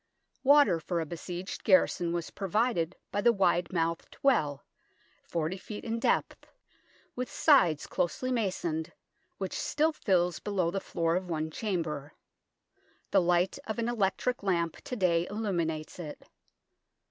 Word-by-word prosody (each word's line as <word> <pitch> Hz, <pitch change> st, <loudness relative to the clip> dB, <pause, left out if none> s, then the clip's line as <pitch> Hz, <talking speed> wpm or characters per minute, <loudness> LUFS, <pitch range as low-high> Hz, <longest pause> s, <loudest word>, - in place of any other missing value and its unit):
Water 280 Hz, -, +6 dB
for 170 Hz, +2 st, -2 dB
a 165 Hz, -, -1 dB
besieged 175 Hz, +3 st, -6 dB
garrison 180 Hz, -3 st, +3 dB
was 170 Hz, -1 st, -3 dB
provided 195 Hz, -3 st, 0 dB, 0.2 s
by 205 Hz, -, 0 dB
the 235 Hz, -, +6 dB
wide 180 Hz, -4 st, +2 dB
mouthed 165 Hz, -2 st, -2 dB
well, 150 Hz, -, +2 dB, 0.6 s
40 170 Hz, +3 st, -2 dB
ft. 210 Hz, +2 st, -7 dB
in 230 Hz, 0 st, -2 dB
depth, -, -, 0 dB, 0.7 s
with 250 Hz, 0 st, -3 dB
sides 175 Hz, -, +4 dB
closely 255 Hz, +9 st, -1 dB
masoned, 180 Hz, -8 st, -1 dB, 0.4 s
which 190 Hz, -1 st, -4 dB
still 310 Hz, +2 st, +1 dB
fills 180 Hz, -, +1 dB
below 185 Hz, -5 st, 0 dB
the 195 Hz, +1 st, -2 dB
floor 165 Hz, 0 st, 0 dB
of 180 Hz, 0 st, -2 dB
one 160 Hz, -1 st, -2 dB
chamber. 160 Hz, -8 st, -3 dB, 1.0 s
The 195 Hz, -, +5 dB
light 175 Hz, +1 st, +2 dB
of 220 Hz, -, -3 dB
an 230 Hz, 0 st, -1 dB
electric 240 Hz, +2 st, 0 dB
lamp 170 Hz, -4 st, 0 dB
to 250 Hz, -, -4 dB
day 175 Hz, -5 st, +2 dB
illuminates 175 Hz, -7 st, -2 dB
it. 155 Hz, -4 st, -8 dB
180 Hz, 135 wpm, -30 LUFS, 165-210 Hz, 1.0 s, Water